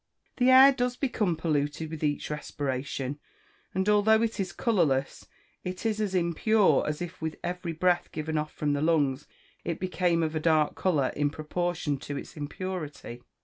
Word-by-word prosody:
The 250 0 +4
air 260 +1 +9
does 250 -2 -1
become 215 - 0
polluted 155 -1 -1
with 160 -1 -6
each 145 0 -1
respiration, 140 -1 -3 0.6
and 190 +1 0
although 215 +2 +4
it 225 -1 -2
is 185 -2 -1
colourless, 160 - 0 0.4
it 180 +4 -5
is 215 -1 0
as 200 -3 -1
impure 185 +5 +3
as 150 +3 -2
if 175 0 -9
with 160 0 -3
every 175 -1 -3
breath 175 +2 +1
given 155 0 -4
off 155 0 -1
from 145 -1 -1
the 145 - -1
lungs 145 -4 +1 0.4
it 170 - -3
became 180 -2 +1
of 160 0 -1
a - - +1
dark 155 -2 +2
colour 150 -8 +1
in 145 0 +1
proportion 155 -1 -2
to 145 +1 -5
its - - -8
impurity. 150 -5 -6
165 Hz, 170 wpm, -28 LUFS, 150-185 Hz, 0.6 s, air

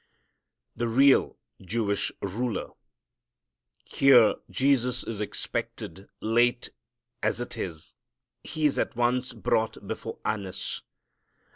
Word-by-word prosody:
The 120 +1 -1
Real 135 +4 +4 0.2
Jewish 100 +1 -1
Ruler. 110 +2 -2 1.1
Here 125 -5 +6 0.2
Jesus 130 -2 +2
is 110 -2 -5
expected. 100 -1 -5
Late 120 +2 +2 0.5
as 110 +1 0
it 120 - -5
is 80 -4 -6 0.5
He 155 -1 -2
is 145 - +2
at - - -1
once 125 +2 +1
brought 110 -1 -1
before - - -5
Annas. 100 -4 -3
115 Hz, 100 wpm, -27 LUFS, 105-125 Hz, 1.1 s, Here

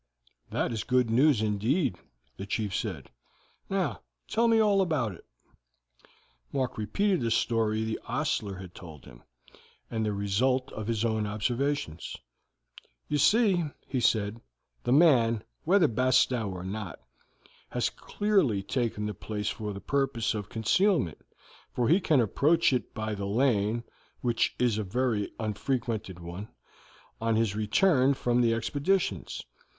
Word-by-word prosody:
"That - - -1
is 110 -2 -2
good 125 -2 +2
news 130 -1 +4
indeed," 110 - +1 0.4
the 95 - -7
chief 105 -2 -2
said. 90 - -4 0.6
"Now 195 -1 -1 0.3
tell 230 +1 +2
me 225 -1 +4
all 205 -2 +4
about 150 - 0
it." 85 - -14 1.3
Mark 130 -3 -1
repeated 185 - 0
the 115 - 0
story 110 -1 +1
the 110 0 -3
ostler 120 -6 -1
had 90 -1 -10
told 80 -6 -11
him, - - -14 0.7
and 110 -1 -1
the 105 - 0
result 120 +7 0
of 110 -1 -6
his 115 -1 0
own 110 -2 0
observations. 115 - -2 0.9
"You 150 - +1
see," 185 - +4 0.2
he 130 - -2
said, 110 -1 +1 0.4
"the - - 0
man, 125 -7 +5 0.2
whether 180 0 +5
Bastow 125 -2 +2
or 90 -1 -6
not, 95 -1 -5 0.7
has - - 0
clearly 190 - +1
taken 115 -2 -1
the 105 - -2
place 105 +2 -4
for 105 -2 -4
the 100 0 -7
purpose 135 -1 0
of 105 -2 -5
concealment, 115 - +1 0.5
for 120 -2 +1
he 170 +5 +5
can 155 -7 +3
approach 140 - +3
it 125 -5 -1
by 110 0 -2
the 100 -1 -4
lane, 115 0 +1 0.4
which 120 -2 +1
is 120 -4 +1
a - - -1
very 110 +1 -1
unfrequented 110 -3 -2
one, 85 +5 -7 0.7
on 115 0 +1
his 110 -2 +1
return 130 - +3
from 125 -1 +1
his 115 -1 +3
expeditions. 140 - -1
115 Hz, 140 wpm, -28 LUFS, 105-140 Hz, 1.3 s, man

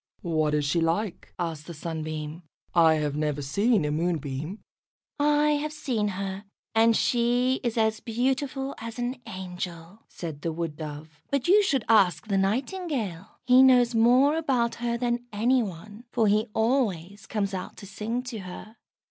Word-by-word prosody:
"What 155 -3 +1
is 150 -1 0
she 165 +4 +1
like?" 170 +5 -1
asked 165 -3 -4
the 170 - -7
Sunbeam. 155 0 -5 0.3
"I 165 -2 +6
have 150 -2 -1
never 150 -1 -1
seen 200 - +2
a 150 - 0
Moonbeam." 155 +1 -2 0.6
"I 295 +1 +3
have 300 +1 -1
seen 255 -9 -1
her, 195 0 -4 0.3
and 225 0 +4
she 245 +2 +2
is 235 -1 -1
as 220 -1 +2
beautiful 270 +3 -1
as 230 +1 -7
an 245 +1 -3
angel," 180 0 -7
said 160 -4 -7
the 165 - -2
Wood 160 -2 -4
dove. 150 -1 -8
"But 280 0 0
you 405 +4 +6
should 280 - +1
ask 185 -8 +4
the 195 - +2
Nightingale. 220 - -2
He 250 +1 +7
knows 250 -2 +6
more 250 +7 +5
about 255 -7 +1
her 235 0 0
than 240 0 -1
any 240 +5 +2
one, 205 +3 -7
for 230 -3 +2
he 215 +2 +3
always 205 -6 0
comes 200 -2 -2
out 185 -1 -5
to 200 - -10
sing 220 +5 -3
to 245 -3 -6
her." 195 +4 -9
210 Hz, 165 wpm, -27 LUFS, 165-245 Hz, 0.6 s, He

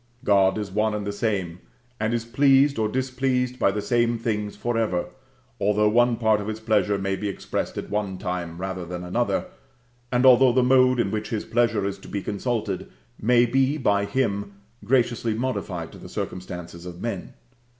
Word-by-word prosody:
God 100 -1 +4
is 105 -2 -4
one 105 +2 +1
and 105 -1 -3
the 100 - -2
same, 100 -5 -2 0.4
and 110 +1 0
is 120 -1 -1
pleased 135 +2 +4
or 110 - +2
displeased 130 0 -1
by - - +4
the 105 +1 -2
same 120 -1 +1
things 105 -3 -2
for 120 +3 -2
ever, 105 -6 0 0.5
although 105 +1 +3
one 120 +2 +3
part 110 -2 +2
of 100 - -6
His 110 0 -4
pleasure 105 -2 +1
may 95 0 -1
be 100 +2 -3
expressed 100 - -4
at - - -5
one 100 -2 -2
time 90 -3 -4
rather 95 0 -4
than 90 +1 -6
another, 120 - 0 0.7
and 125 +1 +2
although 130 -1 +7
the 130 0 +3
mode 130 0 +4
in 100 -4 +1
which 110 0 -3
His 110 -2 -3
pleasure 115 -3 +1
is 100 0 -3
to - - -13
be 100 -2 -4
consulted 115 +2 -2 0.3
may 120 +2 +4
be 135 +4 +2
by 100 -7 +2
Him 100 -5 -1 0.3
graciously 120 -1 +1
modified 105 -9 -3
to - - -12
the - - -11
circumstances 90 -1 -6
of 90 -1 -8
men. 100 -3 -5
110 Hz, 185 wpm, -24 LUFS, 100-120 Hz, 0.7 s, although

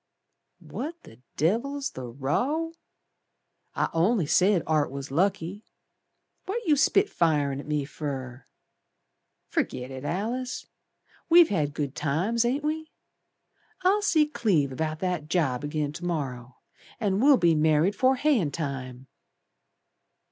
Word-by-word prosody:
"What 310 +6 -5
the 115 - -16 0.2
Devil's 270 - 0
the 130 -1 -7
row? 245 - -1 1.0
I - - +1
only 180 +3 +2
said 180 +2 +3
Art 155 -2 +1
was 140 0 -7
lucky. 185 +4 0 0.8
What 455 +4 -3
you 315 - +4
spitfirin' 165 - +2
at 145 - -9
me 150 -2 -1
fer? 135 -3 -6 1.0
Ferget 125 +1 -2
it, 130 0 -7
Alice. 230 - -3 0.6
We've 340 0 +7
had 150 -7 -1
good 145 -3 -2
times, 180 +11 0
ain't 270 +5 0
we? 315 +1 -2 0.9
I'll 395 +3 +3
see 320 -7 +3
Cleve 170 - 0
'bout 155 +2 -3
that 180 -5 -2
job 145 -7 0
agin 150 0 -2
to 170 +3 -9
morrer, 135 -8 -3 0.5
And 200 -1 0
we'll 280 0 +6
be 170 -5 +4
married 155 +4 +3
'fore 260 +5 +3
hayin' 255 - +2
time." 135 -4 -5
165 Hz, 125 wpm, -27 LUFS, -, 1.0 s, We've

